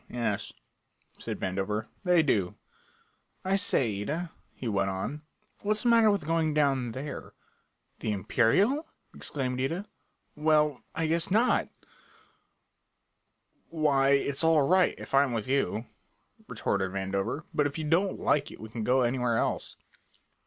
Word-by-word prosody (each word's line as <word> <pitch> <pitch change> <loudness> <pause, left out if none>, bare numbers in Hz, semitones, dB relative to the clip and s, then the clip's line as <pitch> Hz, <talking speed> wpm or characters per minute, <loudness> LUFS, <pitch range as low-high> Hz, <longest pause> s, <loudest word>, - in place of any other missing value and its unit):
"Oh, - - -10
yes," 120 -1 -2 0.7
said - - -5
Vandover, 100 +3 -2 0.2
"they 180 -3 +4
do. 100 - 0 0.9
I 190 +1 +2
say, 120 - +1
Ida," 160 +9 -3 0.2
he 125 - -7
went 100 -3 0
on, 95 +11 -4 0.4
"what's 210 +1 0
the 240 - +3
matter 230 -2 +6
with 200 -7 0
going 160 -1 +1
down 135 -5 +1
there?" 140 +3 -7 0.7
"The 110 - -2
Imperial?" 160 - +2 0.3
exclaimed 130 -3 -2
Ida. 165 +9 -2 0.5
"Well, 150 -2 +2
I 165 - 0
guess 165 +1 +1
not!" 225 +6 +2 2.0
"Why, 145 -4 +2
it's 140 +2 +2
all 160 -2 +4
right, 185 0 +3
if - - -10
I'm 135 -2 +4
with 110 -1 -3
you," 130 -4 0 0.6
retorted 95 -1 -1
Vandover, 100 +8 -2
"but 145 - +2
if 145 - -7
you 160 - -3
don't 180 +5 +1
like 145 -1 +1
it - - -12
we 110 - -9
can 115 0 -5
go 130 +3 +3
anywhere 120 -1 +1
else." - - -2
140 Hz, 140 wpm, -28 LUFS, 115-165 Hz, 2.0 s, matter